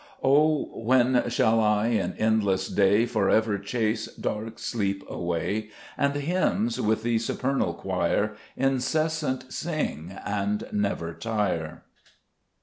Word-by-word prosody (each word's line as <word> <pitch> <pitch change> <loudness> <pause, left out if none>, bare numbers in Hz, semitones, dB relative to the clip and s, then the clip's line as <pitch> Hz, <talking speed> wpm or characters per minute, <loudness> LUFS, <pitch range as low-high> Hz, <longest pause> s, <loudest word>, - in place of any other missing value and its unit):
6 - - -33
O 150 +2 +3
when 125 +1 +3
shall 115 +1 +3
I 105 +1 +2
in 105 -6 0
endless 100 -4 +2
day 100 +3 +4
For 110 -4 0
ever 110 -2 +2
chase 110 +1 -1
dark 110 +1 -4
sleep 100 -4 -2
away, 90 +5 -2 0.3
And 140 0 +1
hymns 185 +9 0
with 110 +1 +1
the 115 -1 +1
supernal 135 +4 -1
choir - - 0 0.2
Incessant 135 0 0
sing, 95 - -3
and 100 0 -1
never 100 -5 -1
tire 100 -8 -2
110 Hz, 120 wpm, -26 LUFS, 100-130 Hz, 0.3 s, day